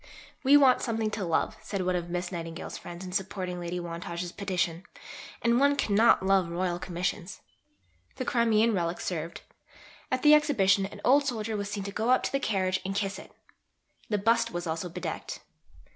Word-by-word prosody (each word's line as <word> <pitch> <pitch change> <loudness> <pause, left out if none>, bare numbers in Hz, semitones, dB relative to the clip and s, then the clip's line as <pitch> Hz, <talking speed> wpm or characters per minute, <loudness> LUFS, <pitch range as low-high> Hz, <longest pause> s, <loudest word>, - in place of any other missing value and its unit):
"We 280 +2 +7
want 265 -3 +5
something 225 -2 -1
to 210 -2 -3
love," 165 -2 0
said 200 -2 -3
one 185 0 +1
of 175 -1 -3
Miss 175 +1 -3
Nightingale's 165 -2 -6
friends 175 +2 -8
in 180 - -7
supporting 185 -1 -3
Lady 175 +1 -4
Wantage's 170 0 -5
petition, 180 -4 -2 0.6
"and 235 +1 +3
one 285 +1 +4
cannot 220 -6 +3
love 190 -3 +3
Royal 175 0 -1
Commissions." 180 +1 -4 0.7
The 255 - -4
Crimean 230 -1 +3
relic 175 -2 -1
served. 165 -2 -4 0.7
At 255 0 0
the 300 0 +8
Exhibition 200 -11 +4
an 205 +1 -12
old 280 +2 +5
soldier 225 -3 -2
was 200 -1 -3
seen 205 -1 -4
to 200 - -5
go 220 +4 -1
up 255 - +4
to - - -1
the 275 - +1
carriage 190 -5 0
and 195 +1 -3
kiss 195 -1 -2
it. - - -13 0.8
The 210 - +1
bust 230 +3 +2
was 175 -5 -4
also 165 +2 -3
bedecked. 180 +1 -5
195 Hz, 180 wpm, -28 LUFS, 175-225 Hz, 0.8 s, the